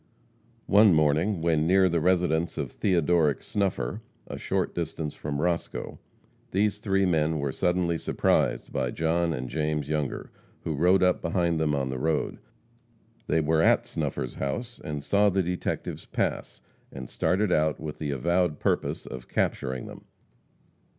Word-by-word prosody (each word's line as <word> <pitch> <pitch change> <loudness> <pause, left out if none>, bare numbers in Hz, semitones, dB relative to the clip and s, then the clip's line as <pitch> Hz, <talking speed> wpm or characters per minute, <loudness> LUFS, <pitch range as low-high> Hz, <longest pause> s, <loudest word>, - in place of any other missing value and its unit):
One 100 -3 +6
morning, 80 +5 +2
when 80 -2 +2
near 95 +1 +5
the 85 -2 0
residence 85 -2 +1
of - - -3
Theodoric 85 -5 +2
Snuffer, 95 - -2 0.2
a - - -7
short - - -2
distance 80 -3 -4
from 70 -1 -4
Roscoe, 85 +1 -2 0.5
these 105 +1 +1
three 95 -2 +1
men 80 -3 +1
were 70 -2 -1
suddenly 90 +1 0
surprised - - 0
by 65 - 0
John 85 +4 0
and 65 -5 -3
James 75 0 -2
Younger, 75 -3 -2 0.3
who 80 - -2
rode 90 +6 +3
up 90 -1 +2
behind 85 -1 0
them 75 -2 +1
in 70 -2 -1
the 65 -1 -3
road. 80 +1 -1 0.9
They 80 - +2
were 80 +1 +2
at - - +4
Snuffer's 65 - -3
house, 115 - -4
and 75 -2 -4
saw 100 +5 +3
the 95 -1 +1
detectives 90 +1 -4
pass, - - -3 0.3
and 65 -2 -7
started 95 - 0
out 80 -2 +2
with 75 -1 -6
the 75 - -3
avowed 85 +4 +1
purpose - - -1
of 65 -2 -8
capturing 65 -1 -1
them. - - -11
80 Hz, 150 wpm, -27 LUFS, 75-90 Hz, 0.9 s, One